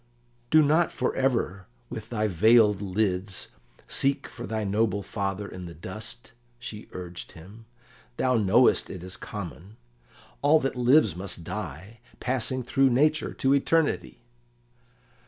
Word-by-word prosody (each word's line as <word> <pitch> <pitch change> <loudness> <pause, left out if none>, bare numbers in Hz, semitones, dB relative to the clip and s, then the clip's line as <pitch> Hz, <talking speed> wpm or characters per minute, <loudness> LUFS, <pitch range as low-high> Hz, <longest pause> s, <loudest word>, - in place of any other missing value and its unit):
"Do 155 0 +6
not 155 +4 +3
for 125 - -1
ever 115 -8 0 0.2
with 110 -2 -7
thy 110 -2 -1
veiled 105 +2 +4
lids 95 -1 -1 0.4
seek 135 +1 0
for - - -8
thy 110 -1 -2
noble 100 0 0
father 100 +1 -3
in 90 -2 -8
the 85 - -10
dust," 110 - -8 0.3
she 110 -3 -8
urged 90 -1 -8
him. 100 +7 -13 0.5
"Thou 130 -1 +2
knowest 110 +4 +4
it 90 -2 -7
is 90 0 -5
common; 95 - -8 0.6
all 150 +2 +5
that 135 - -1
lives 125 - +4
must 90 -2 -5
die, 95 +4 -7 0.2
passing 130 0 0
through 135 +2 +3
nature 150 +5 +2
to 135 +1 +2
eternity." 155 +3 +1
110 Hz, 135 wpm, -27 LUFS, 95-130 Hz, 0.6 s, Do